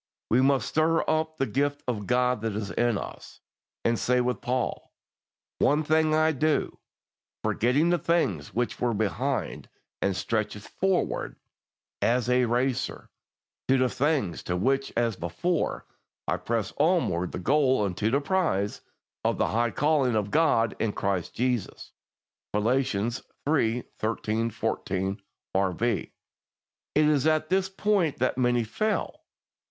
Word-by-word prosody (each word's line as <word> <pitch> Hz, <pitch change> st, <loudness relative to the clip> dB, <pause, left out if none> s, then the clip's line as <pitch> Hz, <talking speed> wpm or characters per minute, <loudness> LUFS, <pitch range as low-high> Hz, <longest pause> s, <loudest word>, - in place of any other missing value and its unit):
We 120 Hz, +3 st, +5 dB
must 135 Hz, 0 st, +2 dB
stir 160 Hz, +1 st, +2 dB
up 160 Hz, 0 st, 0 dB
the 135 Hz, -, +1 dB
gift 145 Hz, +5 st, -1 dB
of 105 Hz, -5 st, -2 dB
God 125 Hz, -2 st, +2 dB
that 110 Hz, -2 st, -2 dB
is 105 Hz, -2 st, -3 dB
in 120 Hz, -3 st, +1 dB
us, -, -, -8 dB, 0.5 s
and 115 Hz, -1 st, +2 dB
say 125 Hz, 0 st, +2 dB
with 125 Hz, -3 st, -1 dB
Paul, 125 Hz, 0 st, -2 dB, 0.7 s
"One 150 Hz, +2 st, +3 dB
thing 155 Hz, 0 st, +3 dB
I 155 Hz, 0 st, +4 dB
do, 155 Hz, +1 st, 0 dB, 0.6 s
forgetting 140 Hz, +9 st, +2 dB
the 175 Hz, -, +2 dB
things 135 Hz, -, 0 dB
which 120 Hz, +1 st, -2 dB
are 120 Hz, -2 st, +1 dB
behind, 120 Hz, +6 st, -2 dB, 0.3 s
and 100 Hz, -1 st, +1 dB
stretching 105 Hz, +1 st, -2 dB
forward" 190 Hz, -, -1 dB, 0.7 s
(as 125 Hz, +1 st, +2 dB
a 125 Hz, 0 st, +4 dB
racer) 125 Hz, +2 st, -1 dB, 0.6 s
"to 135 Hz, -, +4 dB
the 130 Hz, -1 st, +2 dB
things 135 Hz, -, 0 dB
which 135 Hz, +10 st, +1 dB
are 120 Hz, -1 st, +2 dB
before, 110 Hz, -, -2 dB, 0.4 s
I -, -, +1 dB
press 115 Hz, -2 st, -2 dB
on 165 Hz, +3 st, +3 dB
toward 90 Hz, 0 st, -2 dB
the -, -, -4 dB
goal 130 Hz, -, +2 dB
unto 100 Hz, +3 st, -1 dB
the 140 Hz, +4 st, +2 dB
prize 150 Hz, -, 0 dB, 0.4 s
of -, -, +1 dB
the -, -, +1 dB
high 120 Hz, +2 st, +1 dB
calling 140 Hz, -1 st, +2 dB
of 105 Hz, -1 st, -1 dB
God 135 Hz, -8 st, +3 dB
in 110 Hz, -2 st, 0 dB
Christ 95 Hz, -3 st, -2 dB
Jesus" 125 Hz, -3 st, -2 dB, 0.6 s
(Phil. 105 Hz, +3 st, +2 dB, 0.8 s
iii. 125 Hz, -6 st, +2 dB, 0.2 s
13, 110 Hz, +1 st, -1 dB
14, 95 Hz, -1 st, -2 dB, 0.3 s
R.V.). 95 Hz, +2 st, 0 dB, 0.8 s
It 155 Hz, -, +5 dB
is 150 Hz, -1 st, +3 dB
at 155 Hz, 0 st, +2 dB
this 190 Hz, 0 st, +1 dB
point 195 Hz, -5 st, +1 dB
that 130 Hz, 0 st, +1 dB
many 120 Hz, -1 st, +2 dB
fail. 215 Hz, -, -2 dB
125 Hz, 140 wpm, -27 LUFS, 110-150 Hz, 0.8 s, We